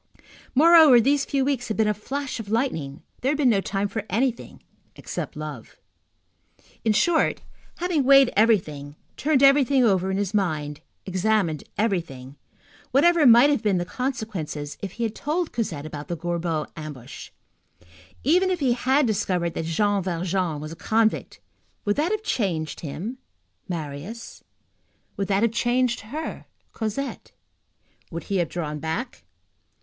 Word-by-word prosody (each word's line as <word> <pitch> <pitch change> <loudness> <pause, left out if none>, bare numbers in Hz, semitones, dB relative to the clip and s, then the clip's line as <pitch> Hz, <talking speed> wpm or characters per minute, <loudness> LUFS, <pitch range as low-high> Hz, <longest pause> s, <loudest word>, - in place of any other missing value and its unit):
Moreover, 315 -3 +8
these 275 +4 +2
few 275 -2 0
weeks 270 -4 -1
had 220 - -3
been 220 -1 +3
a 210 - +2
flash 270 +6 -5
of 210 -3 -7
lightning; 185 - -2 0.2
there 265 +3 +1
had - - -2
been 270 -5 +4
no 200 -3 +2
time 195 +1 -1
for 200 +1 -4
anything 235 +4 -2 0.3
except - - -6
love. 150 -6 -8 1.1
In 220 - +3
short, 320 - +2 0.3
having 345 -5 0
weighed 275 -1 +6
everything, 155 -10 +1 0.2
turned 285 -2 +2
everything 275 -1 +5
over 190 -4 +2
in 190 - -1
his 200 0 -2
mind, 155 -7 -1 0.2
examined 190 -4 0
everything, 165 - -2 0.5
whatever 320 +2 +4
might 240 +5 +7
have 280 - +1
been 205 -4 +1
the 175 - -1
consequences 200 - -4
if 195 -2 -5
he 235 - -4
had 220 -2 -1
told 315 +7 -2
Cosette 165 -11 -3
about 150 -1 -7
the 170 - -4
Gorbeau 170 -2 -2
ambush, 150 -6 -9 0.9
even 360 +7 +3
if 365 -2 -1
he 260 -4 +2
had 265 +4 +2
discovered 180 -6 0
that 160 - -3
Jean 200 +5 +1
Valjean 180 -2 -1
was 155 +1 -7
a - - -7
convict, 220 +4 0 0.5
would 205 0 +1
that 315 +6 +1
have 430 0 -1
changed 170 - -2
him, 185 - -6 0.5
Marius? 165 +7 -6 0.7
Would 195 - -2
that 200 +1 +1
have 230 - +3
changed 240 +1 +1
her, 290 +10 -6 0.3
Cosette? 225 +5 -4 0.8
Would 165 0 -6
he 200 - -2
have 175 -3 0
drawn 150 -4 -4
back? 160 - -4
210 Hz, 150 wpm, -24 LUFS, 170-260 Hz, 1.1 s, Moreover